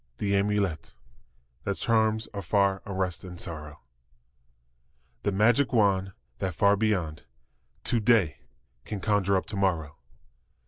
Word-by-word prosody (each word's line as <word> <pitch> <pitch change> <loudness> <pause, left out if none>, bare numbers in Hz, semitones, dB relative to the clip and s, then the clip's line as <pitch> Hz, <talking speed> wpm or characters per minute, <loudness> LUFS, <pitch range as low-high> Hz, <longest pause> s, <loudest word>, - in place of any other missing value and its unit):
The 100 -1 0
amulet 100 -4 0 0.7
That 100 -1 -2
charms 110 -1 +1
afar 100 0 +1
unrest 95 -4 -2
and 90 -2 -9
sorrow; 75 -4 -6 1.4
The 100 - 0
magic 115 +7 +3
wand 95 -4 +2 0.3
that 95 -3 -2
far 100 +4 +4
beyond 95 -8 -1 0.6
To 120 - +1
day 105 -9 +3 0.4
can 105 - -5
conjure 100 -1 +2
up - - -2
to 105 - -7
morrow. 85 -7 0
100 Hz, 120 wpm, -27 LUFS, 90-105 Hz, 1.4 s, far